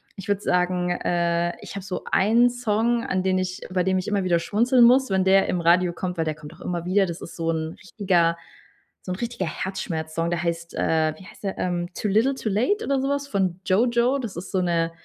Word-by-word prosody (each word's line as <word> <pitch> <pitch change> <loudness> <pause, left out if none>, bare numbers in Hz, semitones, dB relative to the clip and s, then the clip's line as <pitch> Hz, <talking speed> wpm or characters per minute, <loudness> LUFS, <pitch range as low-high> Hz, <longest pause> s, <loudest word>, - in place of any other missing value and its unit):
ich 195 - -9
würd 205 -1 0
sagen, 180 -1 +1
äh, 175 -1 0
ich - - -9
hab 200 - -5
so 185 -1 -5
einen 230 +5 +4
Song, 235 0 0
an 185 -1 0
den 185 0 +1
ich 185 0 -3
bei 185 -1 +1
dem 190 0 +1
ich 185 - -5
immer 205 -2 0
wieder 175 -2 +2
schmunzeln 235 +8 +3
muss, 255 0 +5
wenn 190 -1 +2
der 190 +1 +4
im 180 - -1
Radio 175 +1 +3
kommt, 180 0 -4
weil 165 - 0
der 155 - -1
kommt 150 -1 -11
auch - - -19
immer 175 -1 -3
wieder. 195 +2 +3
Das 170 -2 -6
ist - - -9
so 165 -1 -1
'n 160 0 -3
richtiger 180 -4 +1 0.7
so 185 - -5
'n - - -6
richtiger 235 -6 -3
Herzschmerz-Song. 165 -2 -3
Der 170 - -1
heißt, 170 0 -3
äh 155 -1 +1
wie - - -13
heißt - - -16
der, 195 - -3
ähm? 175 -1 -1
„Too - - -2
Little 225 +7 +3
Too 220 - -3
Late“ 255 - +1
oder 275 -1 +1
so 270 - -1
was 280 0 -1
von 190 -7 -1
„JoJo.“ 240 +6 +2
Das 230 -9 -5
ist 175 - -7
so 190 - +1
'ne, 170 -2 0
185 Hz, 235 wpm, -24 LUFS, 170-215 Hz, 0.7 s, muss